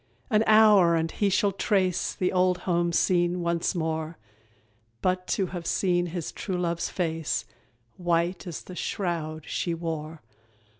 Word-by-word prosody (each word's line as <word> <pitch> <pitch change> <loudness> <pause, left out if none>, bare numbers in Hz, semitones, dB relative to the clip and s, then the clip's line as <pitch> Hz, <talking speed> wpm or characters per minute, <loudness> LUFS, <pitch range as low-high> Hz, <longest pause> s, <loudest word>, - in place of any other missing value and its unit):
An 215 0 +4
hour! 210 -6 +6
and 165 0 0
he 205 - +1
shall 200 +1 +2
trace 190 -2 0
The 180 - 0
old 180 0 +2
home 175 -1 +1
seen 175 0 +2
once 170 +1 0
more; 160 -1 -2 0.9
But 185 0 0
to 195 - +1
have 170 -2 -5
seen 175 -2 +1
his 170 -1 -4
true 185 -2 -4
love's 170 -1 -1
face 165 -3 -2 0.5
White 175 +1 0
as 170 - -6
the 185 - -10
shroud 165 -5 -3
she 170 -2 -2
wore! 160 -2 -5
175 Hz, 145 wpm, -27 LUFS, 165-185 Hz, 0.9 s, hour